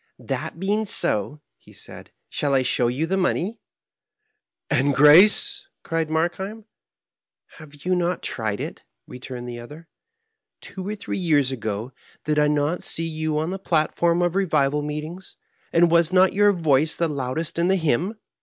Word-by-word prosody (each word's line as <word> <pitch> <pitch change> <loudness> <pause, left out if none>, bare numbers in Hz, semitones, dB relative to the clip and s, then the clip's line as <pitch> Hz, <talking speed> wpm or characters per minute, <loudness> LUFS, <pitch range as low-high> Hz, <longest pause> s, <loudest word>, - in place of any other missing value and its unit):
"That - - -5
being 205 +3 -1
so," 145 - 0 0.2
he - - -19
said, - - -11
" - - -52
shall 140 -2 -1
I 130 - +3
show 125 -1 +1
yon 135 +7 -1
the 190 +3 0
money? 190 +4 -1 0.6
" - - -52 0.3
"And 140 +1 +2
grace?" 210 - +6 0.2
cried 165 -1 -2
Markheim. 190 +7 -2 0.9
"Have 145 -1 -14
you 185 - +1
not 180 0 -1
tried 110 -3 -3
it?" - - -6 0.2
returned 125 -1 -8
the 120 -1 -7
other. 150 +7 -12 0.4
" - - -54 0.3
Two 190 0 -8
or 210 - -3
three 205 - -5
years 145 -7 +2
ago, 110 -1 -4 0.3
did 150 0 +1
I 150 - +4
not 150 +3 0
see 165 - -1
you 155 -1 -2
on 160 +3 -1
the 195 - -5
plat 155 -5 0
form 170 +1 +2
of 175 -1 0
revival 150 -7 +1
meetings, 150 +5 -6 0.3
and 170 0 +4
was 170 0 +3
not 185 0 +4
your 205 +1 +4
voice 160 -4 +2
the 170 - 0
loudest 150 +4 -3
in 170 - +2
the 190 - +3
hymn?" 170 - 0
160 Hz, 175 wpm, -23 LUFS, 145-180 Hz, 0.9 s, grace